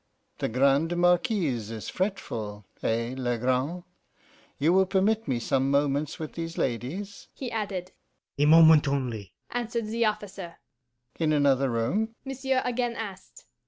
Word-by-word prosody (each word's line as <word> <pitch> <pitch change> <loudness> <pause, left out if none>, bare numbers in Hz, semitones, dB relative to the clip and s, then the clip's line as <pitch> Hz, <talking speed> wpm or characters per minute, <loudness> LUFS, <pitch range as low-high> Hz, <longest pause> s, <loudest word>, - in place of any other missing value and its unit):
The - - -1
Grande 140 +7 +2
Marquise 175 - +2
is 110 -2 -6
fretful 110 - -3 0.2
eh, 115 +2 0
Legrand? 130 +6 -1 0.7
You 160 +5 +3
will 190 0 +4
permit 210 +4 +1
me 125 -3 0
some 135 +3 +1
moments 140 +1 +1
with 160 -3 -6
these 165 0 -5
ladies?' 150 - -3
he 255 -3 -5
added. 195 -5 -3 0.5
'A 145 - +4
moment 160 -1 +7
only,' 120 -8 -2 0.2
answered 235 -1 -2
the 230 +2 0
officer. 195 -5 -3 0.6
'In 160 -2 +2
another 140 -2 +3
room?' 200 - -1
monsieur 265 -1 -1
again 245 -1 -1
asked. 195 -4 -8
165 Hz, 130 wpm, -27 LUFS, 130-205 Hz, 0.7 s, moment